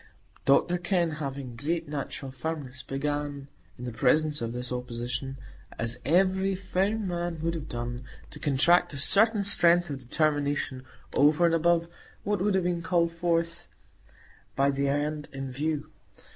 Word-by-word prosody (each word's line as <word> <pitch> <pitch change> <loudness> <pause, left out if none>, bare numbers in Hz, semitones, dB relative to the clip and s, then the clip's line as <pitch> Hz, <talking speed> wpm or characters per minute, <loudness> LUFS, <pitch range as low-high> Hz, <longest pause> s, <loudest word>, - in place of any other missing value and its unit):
Dr 175 +6 +3
Kenn, 175 -2 +1
having 135 -4 -5
great 165 +6 -2
natural 140 -2 -5
firmness, 130 -1 -5
began, 145 +1 -3 0.3
in 125 - -7
the 120 - -4
presence 150 +6 +2
of 115 -1 -2
this 125 +1 -4
opposition, 125 +2 -4 0.4
as 115 +1 -1
every 190 +5 +2
firm 195 +3 -1
man 175 -1 -2
would 165 0 0
have 160 -2 -6
done, 120 +1 -4 0.3
to - - -10
contract 170 +5 +4
a - - -5
certain 210 +8 +4
strength 175 -4 +4
of 140 - -4
determination 145 0 0 0.3
over 150 +4 +4
and 170 - +3
above 170 0 +3 0.4
what 205 -2 0
would 200 0 +2
have 190 - +2
been 175 -1 0
called 170 -1 +1
forth 170 0 -1 0.9
by 140 +1 +3
the 140 0 0
end 150 +1 -1
in 135 -1 -5
view. 150 +2 -2
150 Hz, 150 wpm, -28 LUFS, 135-175 Hz, 0.9 s, contract